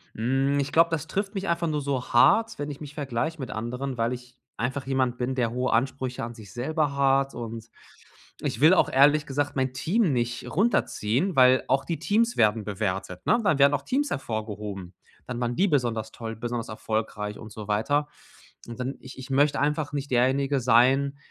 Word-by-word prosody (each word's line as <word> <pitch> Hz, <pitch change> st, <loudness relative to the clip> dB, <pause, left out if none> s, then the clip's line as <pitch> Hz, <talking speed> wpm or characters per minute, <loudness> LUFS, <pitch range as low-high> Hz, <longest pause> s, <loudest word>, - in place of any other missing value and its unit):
Hm, 135 Hz, +5 st, +1 dB
ich 140 Hz, 0 st, -2 dB
glaube, 165 Hz, +1 st, +5 dB
das 160 Hz, -1 st, -3 dB
trifft 200 Hz, +4 st, -3 dB
mich 195 Hz, 0 st, -3 dB
einfach 170 Hz, -1 st, 0 dB
nur 150 Hz, -2 st, -1 dB
so 135 Hz, -2 st, -3 dB
hart, 225 Hz, -, +4 dB
wenn 145 Hz, 0 st, -4 dB
ich 140 Hz, -, -10 dB
mich 145 Hz, -1 st, -8 dB
vergleiche 145 Hz, +3 st, -3 dB
mit 130 Hz, -, -5 dB
anderen, 125 Hz, +4 st, -4 dB
weil 115 Hz, +2 st, 0 dB
ich 125 Hz, 0 st, -10 dB, 0.2 s
einfach 130 Hz, +3 st, -2 dB
jemand 130 Hz, -2 st, 0 dB
bin, 125 Hz, +2 st, -2 dB
der 120 Hz, -3 st, 0 dB
hohe 125 Hz, +1 st, -1 dB
Ansprüche 130 Hz, +1 st, -1 dB
an 115 Hz, +1 st, -5 dB
sich 105 Hz, -5 st, -12 dB
selber 145 Hz, -, -1 dB
hat 135 Hz, 0 st, +2 dB
und 115 Hz, -1 st, -7 dB, 0.7 s
ich -, -, -3 dB
will 160 Hz, +4 st, +7 dB
auch 185 Hz, -, +3 dB
ehrlich 145 Hz, +3 st, +4 dB
gesagt 145 Hz, +1 st, -2 dB
mein 130 Hz, -1 st, 0 dB
Team 180 Hz, -, +1 dB
nicht 120 Hz, -1 st, -2 dB
runterziehen, 180 Hz, -, +1 dB
weil 130 Hz, 0 st, +5 dB
auch 135 Hz, +1 st, +2 dB
die 165 Hz, -, -3 dB
Teams 230 Hz, +3 st, +1 dB
werden 110 Hz, 0 st, +3 dB
bewertet, 95 Hz, -3 st, -3 dB
ne? -, -, +4 dB
Dann 160 Hz, -8 st, +2 dB
werden 140 Hz, +1 st, +6 dB
auch 145 Hz, -, 0 dB
Teams 280 Hz, -, 0 dB
hervorgehoben. 105 Hz, -6 st, -5 dB, 0.3 s
Dann 125 Hz, -1 st, -4 dB
waren 120 Hz, 0 st, -1 dB
die 195 Hz, -, +3 dB
besonders 120 Hz, -, 0 dB
toll, 115 Hz, -1 st, -6 dB
besonders 120 Hz, +1 st, -4 dB
erfolgreich 110 Hz, -1 st, -3 dB
und 110 Hz, -, -11 dB
so 105 Hz, -1 st, -8 dB
weiter. 145 Hz, +8 st, +1 dB, 0.6 s
Und 120 Hz, +1 st, -9 dB
dann 130 Hz, +2 st, -3 dB
ich 130 Hz, -, -12 dB
ich 130 Hz, 0 st, -9 dB
möchte 145 Hz, +2 st, +2 dB
einfach 145 Hz, +1 st, 0 dB
nicht 140 Hz, -1 st, -4 dB
derjenige 135 Hz, +3 st, +2 dB
sein, 130 Hz, +4 st, +3 dB
130 Hz, 195 wpm, -26 LUFS, 115-145 Hz, 0.7 s, will